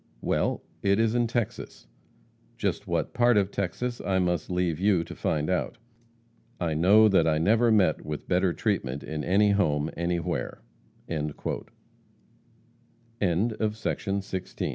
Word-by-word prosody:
Well, - - 0 0.2
it 100 +1 +2
is 115 -1 +2
in 120 -1 +2
Texas 115 - -4 0.7
just - - -2
what - - -1
part 120 -2 +4
of 100 -1 +1
Texas 120 +6 -3
I 95 -1 0
must 90 -3 0
leave 90 -3 0
you 95 -3 +3
to - - -9
find 75 -1 -1
out. 95 +6 -1 0.8
I 85 -3 -1
know 100 +8 +6
that 95 -5 +3
I 80 -1 +2
never 115 +8 +3
met 95 -8 +3
with 75 -1 -6
better 90 0 +2
treatment 70 - -2
in 75 -1 -4
any 100 +5 +3
home, 75 -6 +1
anywhere." 85 -8 -2 0.4
CHAPTER 75 -2 -3
XLVI. - - -4 1.6
EPISTLES 100 +4 +1
OF 105 -2 -2
JESSE 95 -2 -6
JAM - - -2
95 Hz, 145 wpm, -27 LUFS, 80-105 Hz, 1.6 s, know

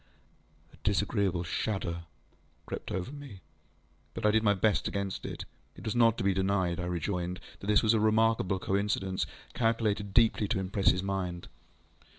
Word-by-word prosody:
ŌĆØ - - -34
A - - -17
disagreeable 95 -4 +1
shudder 85 -1 -2 0.6
crept - - -6
over 95 +7 -3
me, 140 -10 -10 0.7
but - - -3
I 105 - +6
did 110 +1 +3
my 105 -2 +3
best 105 +2 +2
against 100 -1 -3
it. - - -6 0.3
It - - -11
was 110 - -1
not 115 -1 +5
to - - -2
be 100 0 +3
denied, 95 -2 +1
I 90 - -2
rejoined, 90 +1 -2 0.2
that 100 - -8
this 105 0 +4
was 110 0 +4
a 110 - +3
remarkable 110 -3 +3
coincidence, 95 0 -1 0.3
calculated 110 -3 0
deeply 110 -1 +4
to 105 -1 0
impress 95 +1 +2
his 90 - +1
mind. 95 -3 -3
100 Hz, 165 wpm, -30 LUFS, 90-110 Hz, 0.7 s, I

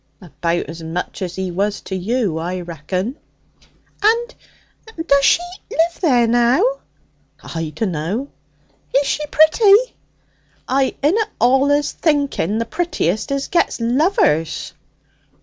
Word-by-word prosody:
'About 175 0 -2
as 165 +3 -9
much 165 +4 -5
as 180 -2 -4
he 190 -1 -3
was 200 +3 -1
to 190 - -6
you, 195 -3 -1
I 180 +2 -3
reckon!' 180 - -4 0.8
'And 465 +4 +2 0.7
does 280 -3 +3
she 335 - +4 0.3
live 335 +1 0
there 250 -9 +4
now?' 245 - +2 0.6
'I 165 -2 -5
dunno.' 190 - -2 0.7
'Is 280 +1 +4
she 300 - -1
pretty?' 400 +11 +4 0.7
'It 265 0 +1
inna 415 +9 +2
allus 280 +4 +3
the 270 - 0
prettiest 280 - -1
as 275 0 -1
get 340 -6 +1
lovers.' 235 - +1
240 Hz, 115 wpm, -19 LUFS, -, 0.8 s, she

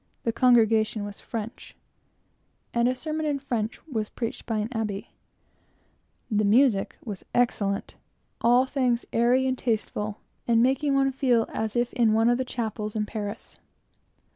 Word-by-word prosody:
The 230 - +1
congregation 225 -3 +3
was 205 -1 -8
French, 225 -1 -7 1.0
and 235 0 +3
a 255 - +1
sermon 310 +2 -3
in 290 -1 0
French 240 -5 -3
was 220 -9 -3
preached 230 -2 -5
by 225 -2 -1
an 210 +1 -1
Abbé; 215 -4 -3 1.2
the 210 0 +2
music 215 0 +3
was 205 -5 -6
excellent, 205 -5 0 0.5
all 245 +2 +5
things 255 -3 0
airy 245 +3 +3
and 260 0 +1
tasteful, 215 -3 -2 0.3
and 230 -1 +4
making 270 +2 +2
one 270 0 +3
feel 255 -4 +2
as 220 0 -2
if 240 0 0
in 235 -4 +3
one 225 +2 +4
of 240 +1 +2
the - - +1
chapels 220 -3 -4
in 210 -1 0
Paris. 210 0 -6
235 Hz, 150 wpm, -26 LUFS, 215-255 Hz, 1.2 s, all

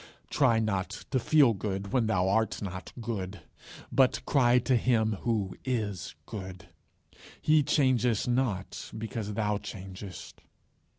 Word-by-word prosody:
Try 130 -6 +4
not 100 -4 -2
to 130 - +2
feel 140 -1 +5
good 100 +1 -4
when 120 -4 +2
thou 95 -3 +2
art 110 +3 +1
not 95 -2 -6
good, 100 -5 -4 0.5
but 130 -2 +3
cry 125 -3 +4
to 125 +1 +2
Him 110 -3 +2
who 105 -5 -1
is 105 -8 -2
good. 95 -3 -8 0.7
He 155 0 +4
changes 125 -6 +2
not 120 -7 -1
because 110 -1 -4
thou 105 -1 0
changest. 95 -2 -9
110 Hz, 125 wpm, -29 LUFS, 95-125 Hz, 0.7 s, feel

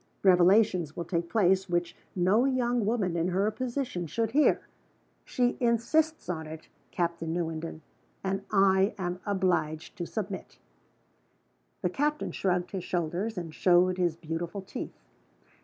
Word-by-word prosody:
Revelations 180 -3 +4
will 170 - -3
take 170 0 -2
place 190 -3 +2
which 175 -1 -1 0.2
no 190 +6 +3
young 245 -4 +1
woman, 205 -7 0
in 170 +1 +1
her 195 +4 +1
position, 240 -6 -3
should 225 +6 -1
hear. 295 +4 +4 0.6
She 245 -1 0
insists 260 - +1
on 160 -3 -3
it, 160 0 -10 0.2
Captain 170 -2 -2
Newenden 165 -1 -3 0.4
and 195 0 -1
I 195 0 +4
am 180 -1 -3
obliged 180 -6 0
to 175 - -3
submit." 200 -3 -5 1.3
The 180 - +2
captain 295 +6 -1
shrugged 180 -2 -1
his 190 -3 -4
shoulders, 180 +5 -2
and 165 -3 -5
showed 180 +2 +3
his 175 -3 +1
beautiful 170 +4 -5
teeth. - - -7
185 Hz, 135 wpm, -29 LUFS, 170-215 Hz, 1.3 s, Revelations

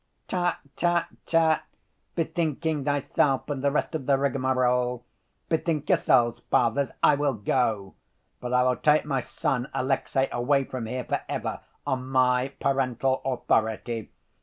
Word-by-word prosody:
"Tut, 175 -1 0 0.2
tut, 175 0 +2 0.2
tut! 165 -1 +3 0.5
Bethinking 160 -3 -1
thyself 145 -1 +1
and 135 -2 -3
the 140 - +4
rest 150 - -1
of 150 -5 -4
the 140 -1 +4
rigmarole. 125 -2 +1 0.4
Bethink 160 -2 -1
yourselves, 120 -2 +3
Fathers, 125 +4 +1
I - - +7
will 145 -2 +1
go. 105 -2 0 0.5
But 125 - -5
I 125 0 +4
will 125 0 +2
take 150 0 +3
my 140 -3 0
son, 125 0 -2
Alexey, 135 +1 0
away 135 +3 +2
from 130 -3 -5
here 125 +2 -3
for - - -2
ever, - - -3 0.3
on 130 -1 -2
my 130 -1 +3
parental 135 -1 0
authority. 115 -3 -1
130 Hz, 135 wpm, -26 LUFS, 125-145 Hz, 0.5 s, I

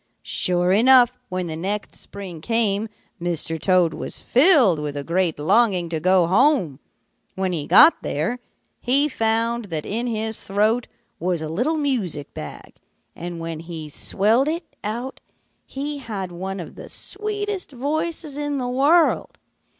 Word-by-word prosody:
"Sure 180 0 0
enough, 245 +4 +6 0.2
when 185 -1 -3
the 160 -2 -5
next 200 +5 -3
spring 185 -5 -8
came, 220 0 0 0.3
Mr. 165 -2 -3
Toad 180 -4 +3
was - - -4
filled 255 - +5
with 145 -1 -4
a 140 - -4
great 170 +1 0
longing 180 +2 +2
to 160 -1 -2
go 185 +1 +3
home. 195 - +2 0.6
When 190 -1 -1
he 150 -4 -3
got 200 - +7
there, 170 +13 -2 0.4
he 275 +4 +3
found 230 -2 0
that 160 -6 -4
in 235 +4 -2
his 220 -1 -2
throat 215 +4 +1 0.3
was 175 0 -1
a - - -4
little 250 - 0
music 220 - -2
bag; 75 - -9 0.4
and 175 0 -6
when 165 -1 -5
he 165 -2 -7
swelled 220 - +2
it 325 +1 -4
out, 240 +5 -4 0.5
he 285 +2 -5
had 200 -8 -5
one 190 +2 -5
of 170 - -8
the - - -11
sweetest 415 -3 -3
voices 295 +3 -3
in 290 -1 -2
the 250 -2 -2
world. 285 +7 +2
210 Hz, 150 wpm, -22 LUFS, 175-260 Hz, 0.6 s, got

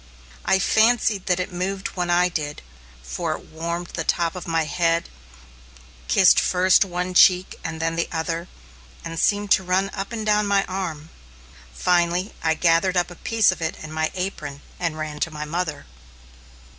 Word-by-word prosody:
I 190 - +4
fancied 220 0 +2
that 180 -1 +2
it 180 0 -4
moved 190 +2 -3
when 180 -1 -3
I 175 +1 +4
did, 150 -4 -4 0.4
for 60 -1 -3
it - - -9
warmed 170 +2 -5
the 165 - -2
top 170 +1 0
of 180 - -7
my 165 -1 +1
head, 165 +1 0 1.0
kissed - - +6
first 185 +1 +4
one 180 -1 -3
cheek 180 +1 +4
and 160 0 -5
then 165 0 -1
the 170 - -1
other, 165 +1 -3 0.6
and 165 0 -5
seemed 205 +1 +1
to 190 - +5
run 190 +2 0
up 195 +2 -5
and 220 -2 -4
down 210 -1 +2
my 200 -1 +2
arm. 165 -5 -5 0.6
Finally 175 - +1
I 160 -1 +1
gathered 170 +3 +2
up 175 0 +1
a - - -9
piece 225 +1 +2
of 185 - -7
it 160 0 -2
in 155 - -8
my 160 0 -1
apron 155 -7 -5 0.2
and 165 -3 -2
ran 155 -1 -5
to 165 - 0
my 150 -1 -6
mother. 160 -1 -3
175 Hz, 175 wpm, -23 LUFS, 165-190 Hz, 1.0 s, kissed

